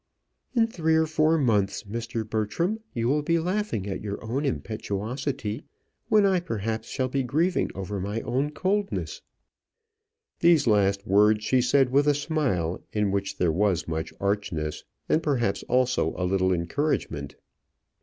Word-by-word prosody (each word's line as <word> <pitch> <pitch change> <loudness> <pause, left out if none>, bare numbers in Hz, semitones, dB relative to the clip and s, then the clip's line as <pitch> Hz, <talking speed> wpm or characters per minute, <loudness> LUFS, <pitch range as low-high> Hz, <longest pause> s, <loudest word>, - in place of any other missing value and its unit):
"In 230 -2 +5
three 160 -8 0
or 160 0 +4
four 160 +1 +2
months, 110 -9 +1
Mr. 115 +1 -4
Bertram, 115 - -1
you 115 -1 -1
will 145 +4 +2
be 165 +3 +1
laughing 180 - -1
at 95 -2 -4
your 100 -1 -4
own 130 +6 -1
impetuosity 110 0 -3 0.5
when 210 -2 +5
I 190 -2 +3
perhaps 110 - -3
shall 130 -1 -1
be 135 +1 -1
grieving 155 +9 +1
over 95 +1 -4
my 100 +4 -3
own 130 +5 -1
coldness." 195 +6 -2 1.2
These 170 -3 +5
last 100 -2 +2
words 105 +1 +4
she 125 +3 +3
said 130 +1 +3
with 140 +2 +3
a 145 - +4
smile 135 - -1
in 105 -2 0
which 100 0 -2
there 90 -2 +2
was 95 0 +1
much 80 -1 -3
archness, 100 -7 -2 0.2
and 160 - +2
perhaps 125 -10 0
also 125 -9 +2
a 90 - -1
little 95 0 +2
encouragement. 85 - -1
115 Hz, 150 wpm, -26 LUFS, 100-150 Hz, 1.2 s, In